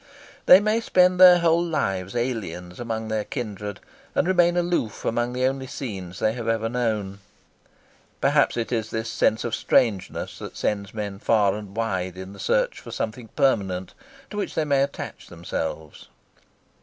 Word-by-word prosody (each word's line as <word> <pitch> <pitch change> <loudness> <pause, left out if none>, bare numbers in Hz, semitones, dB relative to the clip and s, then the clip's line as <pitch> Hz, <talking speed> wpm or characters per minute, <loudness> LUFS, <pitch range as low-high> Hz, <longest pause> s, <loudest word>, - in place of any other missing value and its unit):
They 185 - +10
may 215 +2 +1
spend 180 -4 +3
their 180 -1 +10
whole 170 0 +3
lives 95 - -2
aliens 100 -8 -3
among 110 -2 -3
their 110 -1 -1
kindred 105 -5 -5 0.4
and - - +2
remain 175 -1 +3
aloof 175 -11 -1
among 120 +1 0
the 125 +1 0
only 130 0 -1
scenes 95 -10 -6
they 110 +1 +1
have 120 -1 -5
ever 115 0 +1
known. 110 -5 -2 1.0
Perhaps - - +3
it 115 0 -2
is 110 -2 -1
this 110 0 -3
sense 110 0 +1
of 120 - -3
strangeness 105 -7 0
that - - -8
sends 100 0 -2
men 100 -2 -4
far 105 -4 +3
and 105 -1 -8
wide 95 -5 -2
in 95 +1 -8
the - - -13
search - - +1
for - - -11
something 115 +1 -4
permanent, 100 -10 +1 0.4
to 210 - -6
which 205 - -3
they 160 - +1
may 140 -2 +2
attach 140 0 -4
themselves. 80 -2 -5
115 Hz, 165 wpm, -24 LUFS, 100-140 Hz, 1.0 s, They